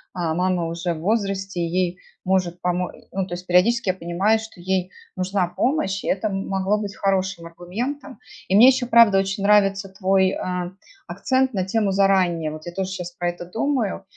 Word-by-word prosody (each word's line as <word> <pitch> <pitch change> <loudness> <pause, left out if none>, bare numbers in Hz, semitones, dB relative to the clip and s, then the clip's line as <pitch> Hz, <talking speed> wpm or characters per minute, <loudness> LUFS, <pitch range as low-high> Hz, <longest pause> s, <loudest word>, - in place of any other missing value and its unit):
а 165 -3 -1
мама 180 -1 0
уже 170 +1 -3
в 155 - -8
возрасте, 195 -2 -1
ей 180 +1 -1 0.3
может 185 -2 0
помо 180 0 -1
э. - - -17
Ну, 190 -1 -2
то 175 - -4
есть 180 +1 -9
периодически 200 +5 +3
я - - +3
понимаю, 190 +5 +1
что 220 -4 -11
ей 185 +1 -1 0.2
нужна 185 0 0
помощь, 195 - -1
и - - -5
это 205 +2 0
м 195 0 -4
могло 195 +2 0
быть 205 -1 -5
хорошим 190 -3 -1
аргументом. 240 - -6 0.3
И 190 - +1
мне 235 +5 +9
ещё, 255 -2 +1
правда, 230 -5 +6
очень 195 +1 -2
нравится 195 -1 +3
твой, 190 -1 +2
а, 180 -1 -3 0.4
акцент 260 -2 0
на 190 -2 0
тему 200 +1 0
заранее. 185 -5 +2
Вот 155 +1 -9
я 175 - -6
тоже 190 0 -3
щас 180 -2 -5
про 175 0 -2
это 175 0 -7
думаю. 225 0 -1
190 Hz, 190 wpm, -22 LUFS, 180-205 Hz, 0.4 s, мне